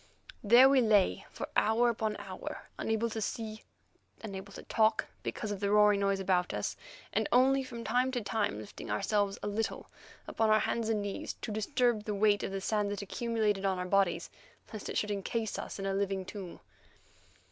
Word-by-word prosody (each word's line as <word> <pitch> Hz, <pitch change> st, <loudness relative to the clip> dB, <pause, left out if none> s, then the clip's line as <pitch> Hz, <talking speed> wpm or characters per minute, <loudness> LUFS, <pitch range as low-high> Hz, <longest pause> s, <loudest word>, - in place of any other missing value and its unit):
There 240 Hz, +5 st, +8 dB
we 270 Hz, -1 st, +5 dB
lay 210 Hz, -4 st, +3 dB
for -, -, -6 dB
hour 235 Hz, +2 st, +3 dB
after 220 Hz, -2 st, -2 dB
hour, -, -, -7 dB
unable 225 Hz, +1 st, 0 dB
to 220 Hz, -, -3 dB
see, 220 Hz, +1 st, -4 dB, 0.6 s
unable 200 Hz, -2 st, -7 dB
to -, -, -9 dB
talk 220 Hz, -1 st, +2 dB, 0.2 s
because 215 Hz, -, -4 dB
of 200 Hz, -, -3 dB
the 200 Hz, 0 st, 0 dB
roaring 210 Hz, -1 st, +5 dB
noise 195 Hz, -1 st, +1 dB
about 180 Hz, -2 st, +1 dB
us, -, -, -2 dB, 0.4 s
and -, -, 0 dB
only 265 Hz, +1 st, +4 dB
from 235 Hz, -2 st, -7 dB
time 250 Hz, +3 st, +2 dB
to 245 Hz, -, -1 dB
time 205 Hz, -, -1 dB
lifting 105 Hz, -1 st, -9 dB
ourselves 200 Hz, -, 0 dB
a -, -, -1 dB
little 215 Hz, +2 st, -3 dB, 0.4 s
upon 225 Hz, -1 st, +1 dB
our 215 Hz, 0 st, +5 dB
hands 230 Hz, -1 st, -1 dB
and 215 Hz, -2 st, 0 dB
knees 200 Hz, -1 st, -4 dB
to 220 Hz, -, -3 dB
disturb 220 Hz, 0 st, +1 dB
the 210 Hz, -, -2 dB
weight 205 Hz, 0 st, +3 dB
of 195 Hz, 0 st, -4 dB
sand 210 Hz, -1 st, 0 dB
that 205 Hz, 0 st, -4 dB
accumulated 215 Hz, -1 st, -1 dB
on 190 Hz, -1 st, +1 dB
our 180 Hz, -, -3 dB
bodies, 195 Hz, -1 st, +1 dB, 0.4 s
lest 215 Hz, -, -6 dB
it -, -, -2 dB
should 210 Hz, -, 0 dB
encase 210 Hz, +2 st, -2 dB
us -, -, -6 dB
in 195 Hz, -, -4 dB
a 195 Hz, -, 0 dB
living 195 Hz, -1 st, -1 dB
tomb. 190 Hz, -2 st, -8 dB
210 Hz, 190 wpm, -31 LUFS, 195-225 Hz, 0.6 s, There